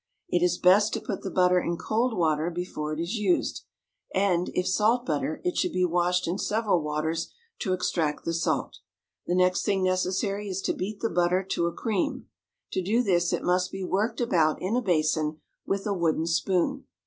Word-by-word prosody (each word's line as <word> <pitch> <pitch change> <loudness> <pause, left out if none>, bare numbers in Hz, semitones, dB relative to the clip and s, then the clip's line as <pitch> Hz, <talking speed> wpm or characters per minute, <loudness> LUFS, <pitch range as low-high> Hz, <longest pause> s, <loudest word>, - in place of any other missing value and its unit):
It 175 - +1
is 180 0 +2
best 200 +4 +4
to - - -1
put - - -5
the 195 - -4
butter 180 0 +3
in 170 -1 -2
cold 225 +4 0
water 160 -1 +1
before 170 -3 -4
it 155 - -3
is 170 +8 -2
used, 200 -4 0 0.5
and, 185 -2 +2
if 180 - +1
salt 220 +6 +2
butter, 155 0 -1
it 360 -1 -1
should 360 -3 0
be 180 - +2
washed 180 +1 +1
in 180 +4 -2
several 210 -5 +1
waters 155 +2 -2 0.3
to 185 - 0
extract 165 -4 -1
the 165 - -1
salt. 165 0 -1 0.5
The 175 - +1
next 180 0 +3
thing 195 -2 +1
necessary 190 +2 0
is 190 0 -3
to - - 0
beat 200 +3 -5
the 230 - 0
butter 175 +2 +2
to 170 - +1
a - - -1
cream. 205 0 -2 0.5
To 190 - -1
do 220 +7 +1
this 175 -4 +2
it - - -1
must 180 +1 +1
be 195 0 -5
worked 200 +5 -1
about 160 -10 +2
in 190 +5 -1
a 250 - +2
basin 155 -5 +1 0.3
with 195 0 -1
a 205 - 0
wooden 165 -3 0
spoon. 170 +2 0
180 Hz, 195 wpm, -27 LUFS, 170-200 Hz, 0.5 s, best